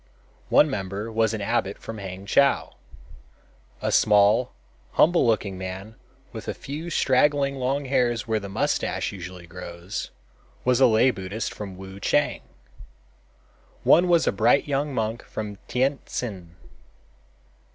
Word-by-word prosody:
One 150 - +6
member 100 -3 -4
was 110 -1 +2
an 105 - -5
abbot 100 -2 -1
from 115 -1 -8
Hangchow. 100 +8 +1 1.1
A - - 0
small, 105 +4 +4 0.4
humble 170 -5 +4
looking 100 -4 0
man 95 +3 -6 0.4
with - - -8
a - - -3
few 155 +5 -6
straggling 140 -1 +2
long 135 +2 -1
hairs 120 -4 +1
where 110 -1 +1
the 100 -1 -8
mustache 95 - -1
usually 90 -2 -9
grows, 85 +1 -7 0.6
was 125 0 +3
a 130 - +8
lay 120 +3 +4
Buddhist 100 +2 -5
from 95 -3 -8
Wuchang. 95 0 -1 1.4
One 175 +2 +5
was 170 -2 +4
a - - +3
bright 115 +8 +3
young 145 +1 -1
monk 115 -2 -2
from 105 -2 -6
Tientsin. 120 - -2
110 Hz, 125 wpm, -25 LUFS, 95-130 Hz, 1.4 s, a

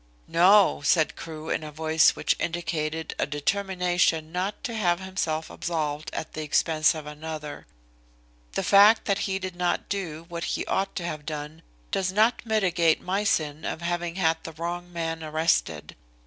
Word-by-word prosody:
"No," 190 +1 +5
said 155 +2 +3
Crewe 160 -1 -7
in - - -1
a 155 - -7
voice 160 +1 +3
which - - +1
indicated 160 -2 -2
a - - +1
determination 175 0 0
not 185 +4 -3
to 235 - -3
have 180 -5 +1
himself 170 -4 -3
absolved 155 -3 -3
at 160 - -5
the 155 - -4
expense 155 +1 +2
of 155 -2 -7
another. 150 0 -7 0.9
"The 195 - -1
fact 205 +4 +6
that 200 -1 +1
he 190 - 0
did 185 -2 -5
not 175 0 -1
do 165 -5 -4
what 170 -1 -5
he - - -2
ought 195 0 -1
to 175 - -3
have 155 -3 -4
done 150 +1 -6 0.3
does 185 -1 0
not 220 +4 +2
mitigate 180 -7 +2
my 195 +3 -1
sin 155 -6 0
of 160 - -4
having 175 0 -2
had 165 -3 +1
the 165 - -7
wrong 175 +2 -5
man 165 -1 -3
arrested. 160 +2 0
165 Hz, 165 wpm, -26 LUFS, 155-185 Hz, 0.9 s, fact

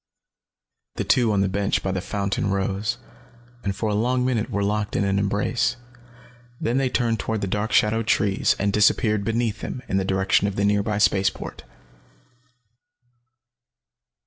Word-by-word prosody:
The - - -2
two 120 -3 +3
on 100 -2 +2
the 100 - +2
bench 100 +1 -1
by 95 - -1
the 95 -1 -2
fountain 100 0 -2
rose, 100 +1 -1 0.7
and 100 -1 -2
for 110 +2 -2
a 105 - 0
long 125 +4 +1
minute 120 -4 0
were 100 - -1
locked 105 0 -1
in - - +1
an 100 0 +1
embrace. 105 +5 0 0.8
Then 120 +3 0
they 135 -1 +1
turned 115 -3 0
toward 110 +2 -2
the - - 0
dark 105 +3 -2
shadowed 110 +1 +2
trees 100 -3 +2
and 100 0 0
disappeared 105 0 +3
beneath 115 0 -1
them, 125 - -5
in 95 - 0
the 95 - +1
direction 95 +1 +2
of 100 - -3
the 100 - +1
nearby 105 +1 +1
space 100 -1 +3
port. - - -9
105 Hz, 165 wpm, -23 LUFS, 100-110 Hz, 0.8 s, two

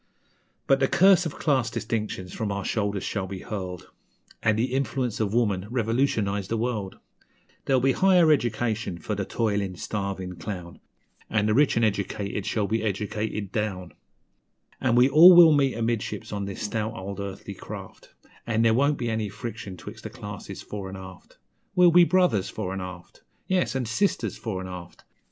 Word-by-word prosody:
But 135 0 +3
the 135 - +3
curse 185 0 +5
o' - - -3
class 135 -5 0
distinctions 105 -5 -4
from 110 -3 -3
our 100 0 -3
shoulders 100 -3 -1
shall 95 -3 -3
be 95 -1 -7
hurled, 90 -4 -6 0.5
An' 110 - +2
the 120 +4 -1
influence 130 -3 -1
of 105 -3 0
woman 105 -5 +1
revolutionize 115 -4 0
the 115 - -1
world; 110 -5 -3 0.7
There'll 130 -2 +2
be 135 - +4
higher 180 0 +5
education 115 - 0
for 105 - -4
the 100 -1 -2
toilin' 100 -4 -1
starvin' 95 -2 -4
clown, 90 -5 -7 0.5
An' 105 -1 +1
the 105 - +2
rich 140 0 +3
an' 115 - +3
educated 100 -1 -2
shall 105 +1 0
be 110 +2 -1
educated 105 -1 -3
down; 100 -5 -3 0.9
An' 120 -3 +2
we 125 +1 +6
all 165 +6 +9
will 170 -3 +9
meet 135 -4 +2
amidships 115 -1 -2
on 100 -1 -2
this 100 +1 -6
stout 110 +2 -2
old 100 0 -6
earthly 100 0 -6
craft, - - -10 0.4
An' 115 -1 +1
there 115 -1 +4
won't 140 +5 +2
be 120 - -3
any 110 -2 -1
friction 100 -2 -7
'twixt 105 +5 -10
the 110 - -5
classes 105 -3 -8
fore 100 -2 -6
'n' 95 - -7
aft. 95 -1 -12 0.4
We'll 180 -1 +6
be 175 +1 +7
brothers, 175 - +2
fore 95 -4 -4
'n' 95 - -4
aft! 90 -1 -9 0.2
Yes, 185 -6 0
an' 130 -2 -1
sisters, 190 - 0
fore 100 -5 -4
'n' 95 - -6
aft! 90 -1 -10
110 Hz, 175 wpm, -26 LUFS, 100-125 Hz, 0.9 s, all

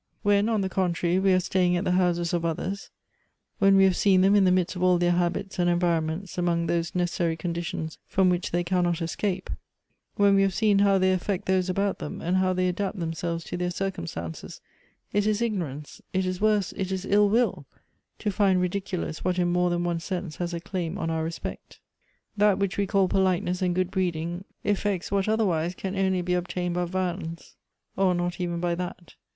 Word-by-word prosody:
" - - -46
When, 205 +1 +3
on 220 -3 +1
the 190 - 0
contrary, 180 -1 0
we 195 0 +3
are 185 - +4
staying 180 -1 +1
at 175 - -1
the 180 - 0
houses 175 -2 +1
of 170 -1 0
others, 185 +4 -3 0.7
when 195 0 +5
we 195 - +6
have 190 -2 +4
seen 190 -1 +4
them 195 +2 +5
in 205 -2 +5
the 185 - +4
midst 185 0 +1
of 180 - -5
all 180 -1 +4
their 175 0 +2
habits 180 +2 -1
and 175 0 +3
environments 175 +1 0
among 170 -1 +1
those 170 0 -1
necessary 170 -2 0
conditions 170 -2 -4
from 190 -1 +2
which 180 0 +1
they 175 +1 0
cannot 175 -1 +1
escape, 185 +3 -2 0.6
when 200 -1 +4
we 195 - +4
have 195 -1 +1
seen 210 -3 +3
how 200 -1 +4
they 185 0 +3
affect 185 +1 -2
those 185 -1 +1
about 195 +2 0
them, - - -6
and 180 +3 0
how 185 0 +2
they 185 0 +1
adapt 195 +3 -2
themselves 165 0 -3
to - - -5
their 180 0 -1
circumstances, 85 - -5 0.5
it 205 0 +2
is 215 -1 +1
ignorance, 170 - -3
it 190 0 +1
is 185 +1 -3
worse, 210 -3 +2
it 190 -1 -2
is 190 0 -3
ill 205 +1 +4
will, 200 - +1 0.5
to 210 - -2
find 195 -2 +3
ridiculous 180 -3 -3
what 185 0 0
in 175 -1 +2
more 180 0 +2
than 175 0 0
one 170 -1 -1
sense 175 -2 -5
has 175 -1 -3
a 170 - -3
claim 175 0 -4
on 165 - -2
our 160 0 -1
respect. 165 +1 -6 0.6
"That 210 -1 +4
which 200 -1 -1
we 200 -1 0
call 195 -1 +3
politeness 185 -1 +1
and 180 -1 +1
good 185 0 0
breeding 175 -1 -2 0.2
effects 205 -3 -1
what 200 +1 +1
otherwise 180 -6 +1
can 190 +1 -4
only 190 -2 +1
be 180 0 -1
obtained 180 0 -2
by 180 0 0
violence, 175 -2 -4 0.4
or 190 -2 +2
not 175 0 -2
even 175 -1 -2
by 175 0 0
that. 175 -2 -6
180 Hz, 205 wpm, -26 LUFS, 175-195 Hz, 0.7 s, we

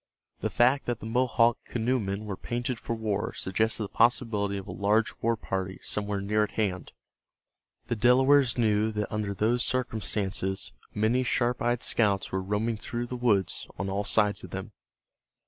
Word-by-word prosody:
The - - -1
fact 130 +4 +3
that 120 -2 -1
the - - -9
Mohawk 120 0 +2
canoemen 110 -4 -1
were 100 -2 -4
painted 120 +3 -3
for 115 - -3
war 105 -3 -2
suggested 110 +3 0
the 100 - -5
possibility 105 -4 +2
of 95 - -6
a - - -5
large 105 +3 +1
war 115 0 +1
party 95 -2 -3
somewhere 105 -1 -1
near 105 +2 +1
at 105 - -4
hand. 95 -5 -2 0.9
The - - -2
Delawares 130 +3 +4
knew 110 -1 +2
that 105 0 -3
under 105 -2 -2
those 120 +4 +2
circumstances 100 -6 -1 0.2
many 110 +4 +2
sharp 125 0 0
eyed 120 0 +1
scouts 100 -4 +1
were 95 - -1
roaming 105 +4 -1
through 120 +2 -4
the 125 - -5
woods 110 -7 +1
on 100 +1 -3
all 100 +1 -1
sides 105 -1 +2
of - - -8
them. - - -6
110 Hz, 165 wpm, -28 LUFS, 100-120 Hz, 0.9 s, Delawares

